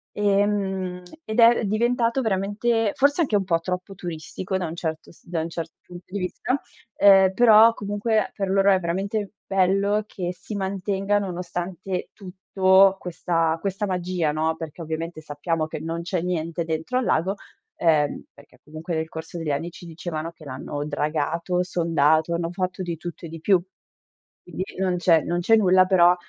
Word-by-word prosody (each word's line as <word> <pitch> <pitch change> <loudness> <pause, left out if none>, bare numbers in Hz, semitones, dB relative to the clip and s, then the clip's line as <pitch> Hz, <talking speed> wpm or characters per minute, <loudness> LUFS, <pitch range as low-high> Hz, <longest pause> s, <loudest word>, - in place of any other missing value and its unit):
Ehm, 195 -3 0 0.2
ed 220 -2 -3
è 235 0 +6
diventato 235 +4 +1
veramente 215 +1 0
forse 285 +5 +3
anche 265 -10 +1
un 200 - +2
po' 170 -2 +1
troppo 180 +3 -4
turistico 180 +2 -5
da 185 - -2
un 165 0 -5
certo 160 -2 -5
s - - -23
da 170 -2 -2
un 165 - -4
certo 165 -1 -6
punto 175 0 -11
di 195 - -5
vista, 220 +8 -2 0.4
ehm, 195 -1 +6
però 225 +1 +7
comunque 205 +1 -1
per 195 -2 -3
loro 195 +1 +4
è 190 - +4
veramente 195 +4 -2
bello 195 +2 +2
che 180 -4 -4
si 205 +3 -8
mantenga 195 +1 -1
nonostante 180 0 -4
tutto 190 0 +3
questa 165 -2 -1
questa 195 +1 -2
magia, 180 -4 -1
no. 160 +1 0
Perché 160 +1 -8
ovviamente 160 +1 -5
sappiamo 155 +2 -2
che 155 - -6
non 165 +2 -4
c'è 175 0 -2
niente 170 -1 -2
dentro 160 +10 -2
al 255 - 0
lago, 185 +5 +1 0.4
ehm, 155 -4 +1
perché 140 - -19
comunque 155 +3 -6
nel 160 0 -2
corso 160 +2 -7
degli 165 -3 -2
anni 155 +5 -2
ci 175 +1 -13
dicevano 165 -1 -5
che 160 -1 -17
l'hanno 145 +1 -5
dragato, 155 +4 -1
sondato, 165 -2 +2
hanno 170 0 -1
fatto 185 +1 -3
di 170 -2 -3
tutto 170 +1 -8
e - - -11
di 165 +1 -8
più. 185 +2 +3 0.8
Quindi 175 +1 -5
non 185 -1 0
c'è 170 -2 +4
non 175 0 -1
c'è 225 +6 +5
nulla, 185 -3 +5
però, 180 -2 +5
180 Hz, 170 wpm, -24 LUFS, 165-195 Hz, 0.8 s, però